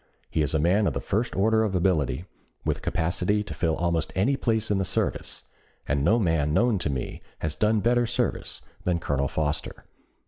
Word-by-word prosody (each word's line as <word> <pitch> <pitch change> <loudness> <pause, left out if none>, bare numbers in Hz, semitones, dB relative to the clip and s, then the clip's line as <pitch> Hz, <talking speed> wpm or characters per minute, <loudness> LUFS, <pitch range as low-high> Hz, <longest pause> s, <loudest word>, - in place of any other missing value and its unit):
He 80 - +1
is 75 +1 0
a - - +3
man 95 +6 +3
of - - 0
the - - -2
first 115 +5 -1
order 110 +3 +3
of 100 -4 -1
ability, 85 -5 +1 0.4
with - - 0
capacity 90 +5 0
to - - -7
fill 80 -2 0
almost 85 -2 0
any 115 +9 +2
place 110 -4 0
in 100 - +2
the - - +1
service, - - -1 0.4
and 70 0 +1
no 105 +9 +4
man 80 -7 +1
known 120 -4 +3
to 80 - -1
me 65 -3 -4 0.2
has 80 -1 -1
done 105 +4 +2
better 120 +1 +3
service 125 0 -2 0.2
than 90 -2 +1
Colonel 70 -4 0
Foster." 75 +1 -2
90 Hz, 195 wpm, -26 LUFS, 80-110 Hz, 0.4 s, no